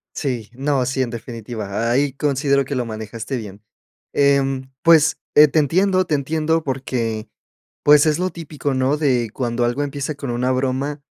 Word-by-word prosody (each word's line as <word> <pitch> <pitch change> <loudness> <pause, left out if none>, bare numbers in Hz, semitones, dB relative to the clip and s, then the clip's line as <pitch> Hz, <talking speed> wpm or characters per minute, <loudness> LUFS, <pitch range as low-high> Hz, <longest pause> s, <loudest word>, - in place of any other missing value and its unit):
Sí, 120 -7 -3
no, 135 0 0
sí, 130 +1 -1
en 125 - -1
definitiva, 115 -2 -4
ahí 135 +3 +1
considero 140 0 +1
que 140 - -4
lo 125 -1 -1
manejaste 110 +3 -5
bien. 105 -3 -7 0.5
Em, 135 -2 +2
pues, 160 -2 +5 0.2
eh, 150 +1 +9
te 150 - -2
entiendo, 185 +5 +2
te 160 - -3
entiendo 155 +3 0
porque, 120 -5 -3 0.6
pues 150 +1 +6
es 155 +1 +2
lo 185 +1 0
típico, 150 -4 -4
¿no? 130 +2 +2
De 125 -7 +1
cuando 120 -1 -1
algo 120 +4 -1
empieza 145 +1 -3
con 140 -2 -6
una 125 +2 0
broma, 135 +3 -1
135 Hz, 165 wpm, -20 LUFS, 120-145 Hz, 0.6 s, eh